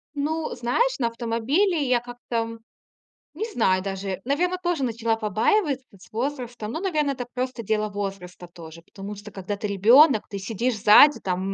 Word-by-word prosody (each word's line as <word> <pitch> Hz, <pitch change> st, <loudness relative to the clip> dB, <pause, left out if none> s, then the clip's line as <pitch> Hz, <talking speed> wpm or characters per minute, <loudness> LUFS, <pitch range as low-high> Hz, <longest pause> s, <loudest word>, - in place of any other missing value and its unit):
Ну, 310 Hz, +3 st, -2 dB
знаешь, 385 Hz, -, 0 dB
на 235 Hz, -, +1 dB
автомобиле 255 Hz, -, 0 dB
я 250 Hz, -1 st, +3 dB
как-то, 245 Hz, 0 st, -9 dB
м, 230 Hz, 0 st, -3 dB, 0.7 s
не 440 Hz, -, -3 dB
знаю 185 Hz, -, +2 dB
даже, 195 Hz, -1 st, -4 dB
наверно, 355 Hz, +7 st, 0 dB
тоже 345 Hz, -5 st, -1 dB
начала 230 Hz, -2 st, 0 dB
побаиваться 260 Hz, -, 0 dB
с 185 Hz, -, -18 dB
возрастом. 240 Hz, -2 st, -4 dB
Ну, 320 Hz, -, -4 dB
наверное, 305 Hz, -7 st, 0 dB
это 245 Hz, -, -5 dB
просто 255 Hz, -2 st, -3 dB
дело 215 Hz, +1 st, 0 dB
возраста 195 Hz, -3 st, -6 dB
тоже. 165 Hz, -1 st, -12 dB
Потому 200 Hz, +3 st, -9 dB
что, 205 Hz, +1 st, -11 dB
когда 200 Hz, +1 st, -5 dB
ты 210 Hz, -, -3 dB
ребенок, 225 Hz, -, +5 dB
ты 200 Hz, -, -5 dB
сидишь 225 Hz, +4 st, -2 dB
сзади, 275 Hz, +9 st, +7 dB
там, 180 Hz, -1 st, -2 dB
230 Hz, 165 wpm, -24 LUFS, 205-280 Hz, 0.7 s, сзади